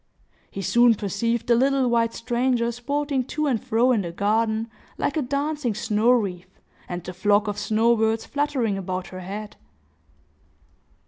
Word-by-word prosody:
He 195 - -6
soon 240 +4 +5
perceived 215 +3 -1
the 240 - +3
little 265 +2 +3
white 230 -1 +1
stranger 240 0 0
sporting 280 +3 -2
to 305 +3 -2
and 255 -7 0
fro 235 +3 +2
in 225 -5 +2
the 170 -3 -5
garden, 220 +4 0 0.3
like - - -1
a 310 - +1
dancing 280 -2 -2
snow 215 +1 +1
wreath, 190 -6 0 0.3
and 175 -1 -4
the 180 - -7
flock 205 +3 +2
of 205 0 -3
snow 225 +3 +2
birds 220 0 0
fluttering 270 -8 -1
about 185 -1 -4
her 185 - -8
head. 205 +3 -7
230 Hz, 155 wpm, -24 LUFS, 205-250 Hz, 0.3 s, soon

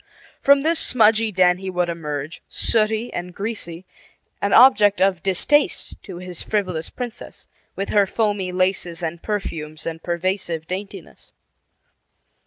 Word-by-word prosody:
From 280 0 +5
this 325 +1 +2
smudgy 225 -2 +3
den 180 -2 +3
he 190 0 -5
would 180 -1 0
emerge, 150 -2 -5
sooty 220 +1 0
and 175 0 -5
greasy, 190 -5 -5 0.6
an 200 - 0
object 210 -5 +6
of 190 -2 +2
distaste 240 - +1
to 185 -4 -9
his 180 -1 -7
frivolous 185 -6 -2
princess, 245 -2 -8 0.3
with 195 - -3
her 205 -2 +3
foamy 205 -4 -1
laces 180 -2 -1
and 165 +1 -4
perfumes 160 -7 -4
and 165 0 -5
pervasive 175 -2 -2
daintiness. 190 +3 -8
190 Hz, 130 wpm, -22 LUFS, 170-215 Hz, 0.6 s, object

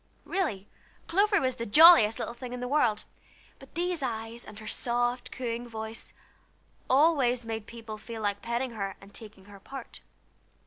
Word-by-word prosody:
Really, 215 - -2 0.4
Clover 405 +4 +3
was 260 -1 -1
the 230 - -4
jolliest 250 -4 +8
little - - -4
thing 245 0 -8
in 250 - -5
the 250 - -3
world; 245 -6 +1 0.5
but 270 - -16
these 350 -1 -1
eyes, 230 -2 -4
and 210 - -12
her 215 - -10
soft 245 +2 -1
cooing 240 -1 -4
voice, 220 0 -7 0.8
always 260 -4 +3
made 225 -1 -5
people 225 -2 -8
feel 225 0 -7
like 205 -1 -1
petting 235 +2 -2
her 195 -4 -4
and 195 +1 -16
taking 210 -4 -10
her 200 -1 -13
part. 265 +5 -9
235 Hz, 165 wpm, -29 LUFS, 220-260 Hz, 0.8 s, jolliest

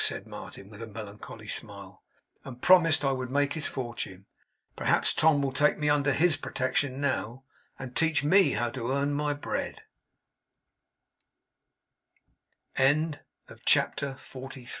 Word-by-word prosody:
said - - 0
Martin, 100 - -10
with 105 +1 -12
a 115 - -6
melancholy 105 -1 -9
smile; - - -4 0.4
'and 125 -2 -10
promised 165 -5 +6
I 135 - +3
would 130 -1 -3
make 145 +1 +1
his 155 - -1
fortune. 120 -7 -6 0.5
Perhaps - - +2
Tom 155 -3 +3
will 135 - 0
take 145 +3 +2
me 150 -1 0
under 145 -1 +2
HIS 160 +2 +3
protection 130 +1 -1
now, 130 -3 -2 0.3
and 130 -2 -8
teach 160 -2 +2
me 190 +6 +4
how 120 -1 -1
to 120 -1 -4
earn 145 +1 -1
140 Hz, 115 wpm, -28 LUFS, 125-150 Hz, 0.5 s, promised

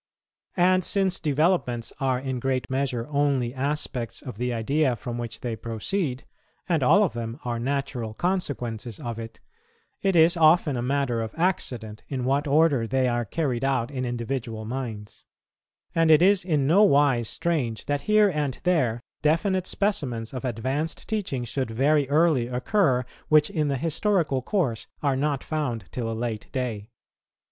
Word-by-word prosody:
And 185 +1 +4
since 190 0 +1
developments 150 -6 0
are 130 -2 +1
in 130 -1 -3
great 130 0 -1
measure 130 -3 -1
only 140 -4 +1
aspects 135 -3 -3
of 125 -6 -8
the 125 0 -1
idea 130 +4 +1
from 120 +1 -5
which 120 -2 -6
they 120 -2 -3
proceed, 125 - -3 0.4
and 165 -4 +1
all 195 +12 +5
of 195 - 0
them 115 +2 -5
are 120 -1 -2
natural 125 -3 -2
consequences 125 - -2
of 115 -2 -5
it, 115 0 -8 0.6
it 195 -2 +1
is 165 +1 +6
often 155 -3 +4
a 120 - -2
matter 125 -2 0
of 110 -1 -5
accident 125 - -1
in 130 -3 -3
what 140 +3 +1
order 145 -5 +3
they 130 +1 +1
are 120 -1 0
carried 130 0 -2
out 135 -2 0
in 130 -2 -3
individual 120 -2 -3
minds; 115 -4 -6 0.7
and 165 -1 +3
it 155 +1 +7
is 195 0 +4
in 155 -6 +1
no 170 +9 +5
wise 140 - +4
strange 130 -10 -1
that 145 -1 -1
here 215 -1 +6
and 150 -8 -1
there 130 -11 +1 0.2
definite 185 +4 +1
specimens 130 - -1
of 130 - -5
advanced 130 +6 -3
teaching 195 - -2
should 130 +1 -3
very 140 +4 +2
early 150 -5 +3
occur, 125 - +1 0.2
which 155 +2 +4
in 155 -6 0
the 140 -1 0
historical 165 - 0
course 130 - -1 0.2
are 140 -2 +2
not 140 0 -1
found 125 -10 -2
till 115 -2 -3
a 110 - -4
late 115 -2 -3
day. 120 -6 -3
135 Hz, 160 wpm, -25 LUFS, 120-155 Hz, 0.7 s, it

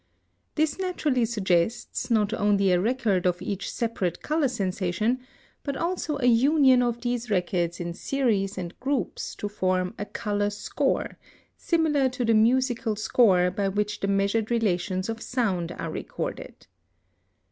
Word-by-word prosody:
This 310 +2 0
naturally 305 -10 0
suggests, 205 0 0
not 220 -2 +2
only 205 -3 +2
a 180 - +4
record 215 -5 +1
of 180 0 0
each 200 -1 -4
separate 200 -7 -2
color 305 -1 +1
sensation, 200 +2 -1 0.4
but 280 -2 -4
also 335 -3 -2
a 265 - -1
union 260 +2 +5
of 240 -1 -1
these 240 -1 -2
records 175 -3 0
in 175 -1 -4
series 205 -3 0
and 175 -1 -5
groups 265 -6 -2
to 205 - -4
form 185 -3 -1
a 205 - -2
color 205 0 -1
score, 205 - -2 0.4
similar 315 -6 +1
to 250 -1 -3
the 230 - +3
musical 240 0 +2
score 200 -4 +3
by 195 +1 -1
which 210 +2 -1
the 195 - -1
measured 200 +2 +1
relations 185 -5 0
of 225 0 -4
sound 190 -9 -1
are - - -5
recorded. - - -6
215 Hz, 145 wpm, -26 LUFS, 190-250 Hz, 0.4 s, union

